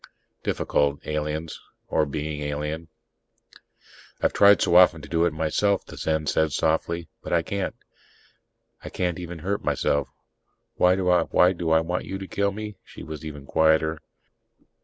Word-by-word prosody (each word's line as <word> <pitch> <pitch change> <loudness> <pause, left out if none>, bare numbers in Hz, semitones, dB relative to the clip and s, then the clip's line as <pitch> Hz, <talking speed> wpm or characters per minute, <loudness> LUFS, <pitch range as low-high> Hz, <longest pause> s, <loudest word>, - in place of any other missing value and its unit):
Difficult, 70 +1 0
aliens 75 +1 -3 0.3
or 75 - +1
being 75 +1 -4
alien. 75 +3 -4 1.3
"I've - - +1
tried 100 0 +6
so - - +2
often 90 -2 +7
to - - -9
do 85 0 +1
it 85 - +1
myself," 80 +6 0
the - - -11
Zen 80 -1 -1
said 80 +1 +1
softly. 80 +2 0
"But - - -5
I 85 -1 +3
can't. 100 +2 -3 1.1
I - - -6
can't 90 -1 -2
even 90 -1 -6
hurt 95 +6 -3
myself. 70 0 0 0.6
Why 90 0 +4
do 95 -1 -2
I 90 -1 +5 0.6
want 90 +2 -3
you 95 - -4
to 95 0 -7
kill 100 +1 0
me?" 105 0 -7
She - - -12
was 80 -1 -8
even 75 -3 -8
quieter. 80 +1 +2
80 Hz, 150 wpm, -25 LUFS, 75-90 Hz, 1.3 s, often